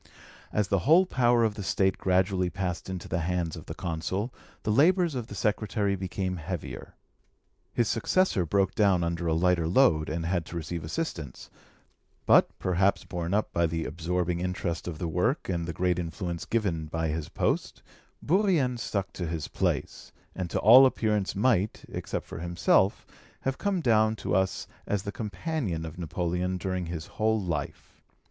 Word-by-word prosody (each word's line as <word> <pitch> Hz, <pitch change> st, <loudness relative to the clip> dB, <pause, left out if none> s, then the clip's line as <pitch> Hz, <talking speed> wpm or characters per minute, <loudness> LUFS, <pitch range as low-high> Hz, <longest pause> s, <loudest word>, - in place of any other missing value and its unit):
As 105 Hz, -2 st, 0 dB
the 100 Hz, -, +2 dB
whole 175 Hz, +4 st, +7 dB
power 120 Hz, -7 st, +3 dB
of 110 Hz, -2 st, +2 dB
the 105 Hz, -, -7 dB
State 95 Hz, -1 st, +1 dB
gradually 95 Hz, 0 st, +2 dB
passed 90 Hz, -2 st, -4 dB
into 95 Hz, -2 st, -5 dB
the 85 Hz, -, -1 dB
hands 85 Hz, -1 st, -1 dB
of -, -, -10 dB
the -, -, -6 dB
Consul, 95 Hz, +7 st, -3 dB, 0.3 s
the 105 Hz, -, 0 dB
labours 170 Hz, -, +4 dB
of 125 Hz, -4 st, -4 dB
the 105 Hz, -, -8 dB
secretary 105 Hz, 0 st, 0 dB
became 95 Hz, 0 st, -3 dB
heavier. 85 Hz, +1 st, -6 dB, 0.8 s
His 120 Hz, -, +1 dB
successor 115 Hz, -, +2 dB
broke 95 Hz, +4 st, +1 dB
down 100 Hz, -5 st, +3 dB
under 85 Hz, 0 st, -2 dB
a 80 Hz, -, +2 dB
lighter 85 Hz, -1 st, +2 dB
load, 85 Hz, -6 st, +3 dB
and 80 Hz, +2 st, -3 dB
had 85 Hz, 0 st, 0 dB
to -, -, -8 dB
receive 85 Hz, 0 st, -4 dB
assistance; 80 Hz, -, -5 dB, 0.7 s
but, -, -, +6 dB
perhaps 95 Hz, +2 st, +1 dB
borne 85 Hz, +1 st, -3 dB
up 105 Hz, -, -1 dB
by 85 Hz, 0 st, +2 dB
the 80 Hz, 0 st, -3 dB
absorbing 85 Hz, +2 st, -1 dB
interest 90 Hz, -2 st, -3 dB
of 85 Hz, -3 st, -4 dB
the 85 Hz, -, -3 dB
work 90 Hz, -, 0 dB
and 85 Hz, -3 st, -2 dB
the -, -, -2 dB
great 90 Hz, +1 st, 0 dB
influence 85 Hz, 0 st, -4 dB
given 90 Hz, -9 st, -1 dB
by 80 Hz, +1 st, -2 dB
his 80 Hz, 0 st, -3 dB
post, -, -, -1 dB, 0.4 s
Bourrienne 165 Hz, -, +2 dB
stuck 100 Hz, -3 st, -3 dB
to 90 Hz, -, -4 dB
his 80 Hz, -2 st, -3 dB
place, -, -, -2 dB, 0.2 s
and 90 Hz, -2 st, -4 dB
to -, -, -2 dB
all 130 Hz, +5 st, +9 dB
appearance 105 Hz, -5 st, 0 dB
might, 105 Hz, -1 st, +1 dB
except -, -, -4 dB
for -, -, -8 dB
himself, 85 Hz, +3 st, +2 dB, 0.4 s
have 135 Hz, 0 st, -2 dB
come 200 Hz, -3 st, 0 dB
down 110 Hz, -4 st, +3 dB
to -, -, -3 dB
us 95 Hz, +1 st, +1 dB, 0.2 s
as 100 Hz, -2 st, -1 dB
the 100 Hz, -, -4 dB
companion 105 Hz, -, -3 dB
of 80 Hz, +2 st, -8 dB
Napoleon 90 Hz, +2 st, -2 dB
during 90 Hz, -1 st, -3 dB
his 80 Hz, -2 st, -5 dB
whole 110 Hz, 0 st, 0 dB
life. 85 Hz, -7 st, -5 dB
95 Hz, 170 wpm, -28 LUFS, 85-110 Hz, 0.8 s, all